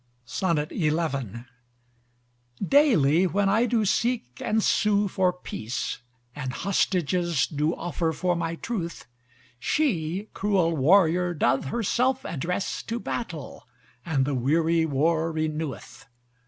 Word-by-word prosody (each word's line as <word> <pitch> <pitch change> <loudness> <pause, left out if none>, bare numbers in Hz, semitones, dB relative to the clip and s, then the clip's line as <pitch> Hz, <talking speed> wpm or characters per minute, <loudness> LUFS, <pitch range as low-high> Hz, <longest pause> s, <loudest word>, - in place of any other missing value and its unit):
XI 150 +4 0 2.0
Daily 190 - +4
when 200 +2 +1
I 225 +5 +3
do 225 -2 +1
seek 210 - -1
and 220 0 +1
sew 205 -1 +2
for 185 -1 +1
peace, 130 -9 -5 0.4
And 130 -3 -4
hostages 175 -4 +1
do 150 +3 -1
offer 170 -1 -2
for 175 +3 0
my 165 0 -2
truth: 170 -4 -5 0.5
She 195 - 0
cruel 190 -5 +1
warrior 175 +3 +3
doth 135 -3 +1
herself 240 - 0
address 180 +6 -2
To 230 +1 -4
battle, 170 - -6 0.4
and 145 -5 +1
the 145 - -1
weary 160 +6 +2
war 160 +3 +1
renew'th. 155 -6 -4
170 Hz, 110 wpm, -26 LUFS, 155-200 Hz, 2.0 s, Daily